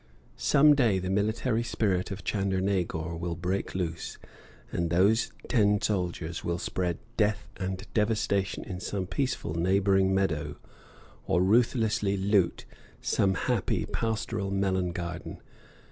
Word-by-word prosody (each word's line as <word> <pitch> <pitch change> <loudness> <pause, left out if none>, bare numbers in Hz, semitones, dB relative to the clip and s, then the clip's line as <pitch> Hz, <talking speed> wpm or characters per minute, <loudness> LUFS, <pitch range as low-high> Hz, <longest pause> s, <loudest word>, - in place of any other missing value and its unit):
Some 150 +2 +5
day 120 -9 +3
the 95 0 -2
military 110 +4 +1
spirit 100 -5 0
of 100 -1 -6
Chandernagor 95 -4 -1
will 85 -1 -3
break 90 +4 -2
loose, 85 -3 -3 0.5
and 85 -1 -1
those 110 +7 +3 0.2
ten 105 -3 +3
soldiers 90 -5 -2
will 85 0 -1
spread 90 -1 -2 0.2
death 105 -1 +1
and 95 +1 -4
devastation 105 -3 0
in 90 -2 -6
some 95 0 -3
peaceful 125 - -2
neighboring 95 +3 +3
meadow, 95 -6 0 0.7
or 90 +2 +3
ruthlessly 110 -1 +2
loot 95 -2 +1 0.3
some 95 -1 +1
happy, 70 - 0
pastoral 110 -2 -2
melon 95 -2 0
garden. 85 0 -5
95 Hz, 120 wpm, -28 LUFS, 90-105 Hz, 0.7 s, Some